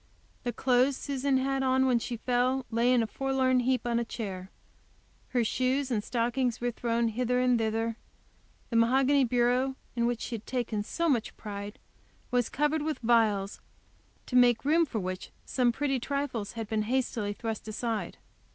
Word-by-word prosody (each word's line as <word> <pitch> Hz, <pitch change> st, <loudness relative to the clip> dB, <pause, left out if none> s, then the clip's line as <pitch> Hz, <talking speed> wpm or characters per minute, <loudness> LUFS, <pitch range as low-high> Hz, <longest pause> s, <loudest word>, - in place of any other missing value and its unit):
The 245 Hz, -, -2 dB
clothes 255 Hz, +2 st, +2 dB
Susan 275 Hz, -1 st, 0 dB
had 270 Hz, +1 st, 0 dB
on 260 Hz, 0 st, +3 dB
when 250 Hz, -2 st, +3 dB
she 240 Hz, +1 st, -4 dB
fell 250 Hz, +2 st, +1 dB
lay 235 Hz, +2 st, +3 dB
in 245 Hz, -2 st, +4 dB
a -, -, 0 dB
forlorn 260 Hz, +2 st, +1 dB
heap 255 Hz, 0 st, +1 dB
on 235 Hz, -1 st, +1 dB
a -, -, 0 dB
chair; 190 Hz, -5 st, -6 dB, 0.8 s
her 245 Hz, -2 st, +1 dB
shoes 260 Hz, +4 st, 0 dB
and 210 Hz, -3 st, 0 dB
stockings 245 Hz, +1 st, 0 dB
were 245 Hz, 0 st, -1 dB
thrown 235 Hz, 0 st, 0 dB
hither 250 Hz, +2 st, 0 dB
and 250 Hz, -1 st, +3 dB
thither; 225 Hz, +1 st, -1 dB, 0.7 s
the -, -, -2 dB
mahogany 265 Hz, +4 st, +4 dB
bureau, 250 Hz, +2 st, +2 dB, 0.2 s
in 235 Hz, -1 st, +1 dB
which 240 Hz, -2 st, -2 dB
she -, -, -5 dB
had 225 Hz, -1 st, -6 dB
taken 235 Hz, -4 st, -1 dB
so 335 Hz, +10 st, -1 dB
much 250 Hz, -8 st, 0 dB
pride, 205 Hz, +1 st, -7 dB, 0.5 s
was 245 Hz, -2 st, +1 dB
covered 295 Hz, +2 st, 0 dB
with 310 Hz, 0 st, -2 dB
vials, 215 Hz, -4 st, +2 dB, 0.6 s
to 250 Hz, -, -5 dB
make 245 Hz, -1 st, +5 dB
room 325 Hz, +3 st, +4 dB
for 235 Hz, -, -4 dB
which 185 Hz, -1 st, -5 dB, 0.2 s
some 250 Hz, -2 st, +2 dB
pretty 270 Hz, +1 st, -1 dB
trifles 255 Hz, -5 st, -3 dB
had 225 Hz, -2 st, -5 dB
been 220 Hz, 0 st, 0 dB
hastily 235 Hz, -5 st, 0 dB
thrust 220 Hz, 0 st, -5 dB
aside. 220 Hz, +1 st, -3 dB
245 Hz, 170 wpm, -29 LUFS, 225-260 Hz, 0.8 s, make